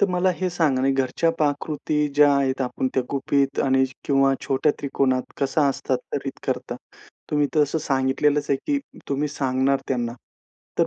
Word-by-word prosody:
तर 200 Hz, -, +4 dB
मला 180 Hz, +1 st, +2 dB
हे 185 Hz, 0 st, -1 dB
सांगा 155 Hz, -7 st, +1 dB
ना, 135 Hz, -, +3 dB
घरच्या 135 Hz, +5 st, +1 dB
पाककृती 150 Hz, 0 st, 0 dB
ज्या 145 Hz, -1 st, +6 dB
आहेत, 135 Hz, -1 st, 0 dB
आपण 130 Hz, +1 st, -1 dB
त्या 130 Hz, -, +2 dB
गुपित 140 Hz, 0 st, 0 dB
आणि 130 Hz, -1 st, +3 dB, 0.2 s
किंवा 135 Hz, -1 st, +3 dB
छोट्या 140 Hz, +2 st, +2 dB
त्रिकोणात 135 Hz, -2 st, +1 dB, 0.2 s
कशा 145 Hz, +2 st, +2 dB
हस्तांतरित 315 Hz, -, -3 dB
करता? -, -, -2 dB, 0.5 s
तुम्ही 150 Hz, -1 st, +2 dB
तर 150 Hz, -, +5 dB
असं 155 Hz, +3 st, 0 dB
सांगितलेलंच 145 Hz, +1 st, +1 dB
आहे, 140 Hz, -, +4 dB
की 285 Hz, -1 st, +1 dB, 0.3 s
तुम्ही 145 Hz, +2 st, 0 dB
सांगणार 135 Hz, -1 st, +1 dB
त्यांना, 120 Hz, -3 st, -1 dB, 0.7 s
तर -, -, +4 dB
140 Hz, 160 wpm, -23 LUFS, 135-150 Hz, 0.7 s, ज्या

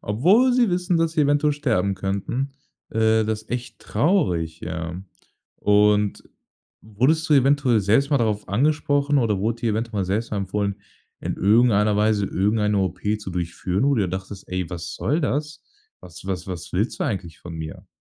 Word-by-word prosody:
obwohl 185 Hz, -, +3 dB
sie 245 Hz, -5 st, +3 dB
wissen, 180 Hz, 0 st, 0 dB
dass 165 Hz, -1 st, +1 dB
sie 155 Hz, -, +1 dB
eventuell 145 Hz, +1 st, +2 dB
sterben 110 Hz, -10 st, 0 dB
könnten, 100 Hz, +8 st, -3 dB, 0.4 s
äh, 110 Hz, 0 st, +2 dB
das 110 Hz, 0 st, -3 dB
echt 120 Hz, -1 st, -5 dB
traurig, 90 Hz, -, 0 dB
ja. 85 Hz, +1 st, -5 dB, 0.6 s
Und 105 Hz, 0 st, +2 dB, 0.6 s
wurdest 130 Hz, +10 st, 0 dB
du 150 Hz, -, +5 dB
eventuell 135 Hz, -4 st, +3 dB
selbst 115 Hz, +9 st, +2 dB
mal 140 Hz, -, +3 dB
darauf 105 Hz, -3 st, -1 dB
angesprochen 145 Hz, +4 st, +1 dB
oder 110 Hz, -5 st, +1 dB
wurde 115 Hz, +4 st, -2 dB
dir 115 Hz, -, +1 dB
eventuell 110 Hz, -1 st, -2 dB
mal 95 Hz, -, 0 dB
selbst 105 Hz, +5 st, -2 dB
mal 105 Hz, -, -2 dB
empfohlen, 100 Hz, +1 st, -2 dB, 0.4 s
in -, -, -3 dB
irgendeiner 105 Hz, 0 st, +3 dB
Weise 105 Hz, -1 st, +2 dB
irgendeine 105 Hz, +2 st, +1 dB
OP 95 Hz, -1 st, -2 dB, 0.2 s
zu 100 Hz, -3 st, -7 dB
durchführen, 90 Hz, +4 st, -2 dB
wo 140 Hz, 0 st, +3 dB
du 110 Hz, -, +1 dB
dir 95 Hz, -, -1 dB
dachtest: 95 Hz, +2 st, -7 dB
„Ey, 90 Hz, -2 st, -3 dB
was 85 Hz, +1 st, -5 dB
soll 155 Hz, +5 st, 0 dB
das? 150 Hz, +1 st, -2 dB, 0.4 s
Was 90 Hz, +1 st, -12 dB
was 95 Hz, -2 st, -3 dB
was 90 Hz, -3 st, -7 dB
willst 105 Hz, +6 st, -1 dB
du -, -, +1 dB
eigentlich 90 Hz, -6 st, -4 dB
von 85 Hz, -1 st, -9 dB
mir?“ 80 Hz, +4 st, -7 dB
105 Hz, 175 wpm, -23 LUFS, 95-140 Hz, 0.6 s, du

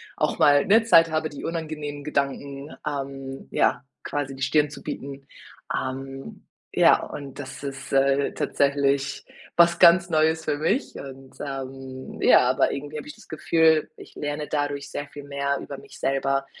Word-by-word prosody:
auch -, -, 0 dB
mal, 145 Hz, -1 st, +6 dB
ne, 225 Hz, +3 st, +6 dB
Zeit 165 Hz, -7 st, +6 dB
habe, 155 Hz, 0 st, 0 dB
die 145 Hz, -, -9 dB
unangenehmen 155 Hz, -3 st, -4 dB
Gedanken, 140 Hz, 0 st, -3 dB
ähm, 135 Hz, -2 st, -5 dB
ja, -, -, +2 dB, 0.2 s
quasi 140 Hz, -2 st, -3 dB
die 135 Hz, -, -5 dB
Stirn 145 Hz, +2 st, +3 dB
zu 145 Hz, -, -11 dB
bieten. 140 Hz, 0 st, -7 dB, 0.5 s
Ähm, 135 Hz, +1 st, -6 dB, 0.3 s
ja, -, -, +6 dB
und 140 Hz, -1 st, -8 dB
das 140 Hz, 0 st, -8 dB
ist, 135 Hz, -1 st, -6 dB
äh, 135 Hz, +1 st, +3 dB
tatsächlich, 140 Hz, -1 st, 0 dB, 0.3 s
was 170 Hz, 0 st, +5 dB
ganz 175 Hz, 0 st, +7 dB
Neues 160 Hz, 0 st, +2 dB
für 145 Hz, -, 0 dB
mich 215 Hz, -, 0 dB
und, 135 Hz, -1 st, -10 dB
ähm 135 Hz, -1 st, -7 dB
ja, -, -, +6 dB
aber -, -, +2 dB
irgendwie 145 Hz, +2 st, -5 dB
habe 150 Hz, -, -7 dB
ich 150 Hz, -, -9 dB
das -, -, -18 dB
Gefühl, 160 Hz, 0 st, +3 dB
ich -, -, -13 dB
lerne 145 Hz, 0 st, -3 dB
dadurch 145 Hz, -1 st, -2 dB
sehr 145 Hz, -, -4 dB
viel 145 Hz, 0 st, -10 dB
mehr 140 Hz, 0 st, -1 dB
über 140 Hz, -, -7 dB
mich -, -, -14 dB
selber, 135 Hz, 0 st, 0 dB
140 Hz, 165 wpm, -25 LUFS, 135-155 Hz, 0.5 s, ganz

